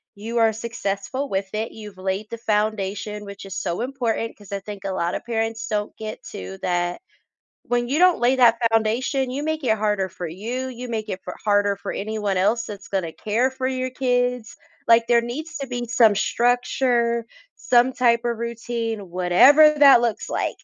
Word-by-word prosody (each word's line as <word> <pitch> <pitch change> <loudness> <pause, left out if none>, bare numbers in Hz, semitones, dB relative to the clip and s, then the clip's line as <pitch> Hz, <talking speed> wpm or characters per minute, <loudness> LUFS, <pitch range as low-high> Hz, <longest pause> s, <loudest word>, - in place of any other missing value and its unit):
you 225 +3 -5
are 225 -1 +4
successful 230 +4 -4
with 195 0 -1
it, 220 +1 -2
you've 210 -3 -11
laid 190 +3 -3
the 230 - -6
foundation, 210 -1 -2
which 200 0 -9
is 195 -2 -7
so 175 +5 -2
important 240 -3 -2
'cause 205 -2 -15
I 200 - -2
think 200 0 -9
a 195 - -1
lotta 175 -1 -1
parents 225 -1 -2
don't 210 -1 -2
get 215 0 -7
to 95 +1 -7
that. 175 - -1 0.7
When 240 0 0
you 280 - +1
don't 365 -1 +5
lay 245 +2 +3
that 235 -2 +5
foundation, 250 +4 +1
you 275 +3 -3
make 315 0 -2
it 220 -3 +2
harder 210 -2 0
for 175 - -6
you, 235 +10 -4
you 250 0 -7
make 220 -2 -3
it 185 - -4
fo - - -4
harder 205 -1 +2
for - - -5
anyone 210 -1 -2
else 220 +5 +1
that's 205 -3 -9
gonna 180 -5 -2
care 230 +5 0
for 260 0 -5
your 255 -1 -2
kids. 245 -2 -1 0.3
Like, 230 0 +5
there 235 -1 +4
needs 280 +7 -6
to 275 -1 -5
be 245 -1 -4
some 225 -3 +4
structure, 240 +1 +1 0.3
some 245 +1 +3
type 235 -2 +3
of 235 -1 -1
routine, 230 -3 -4
whatever 185 - +6
that 275 -4 +8
looks 235 -2 -2
like, - - -1
225 Hz, 185 wpm, -23 LUFS, 205-245 Hz, 0.7 s, that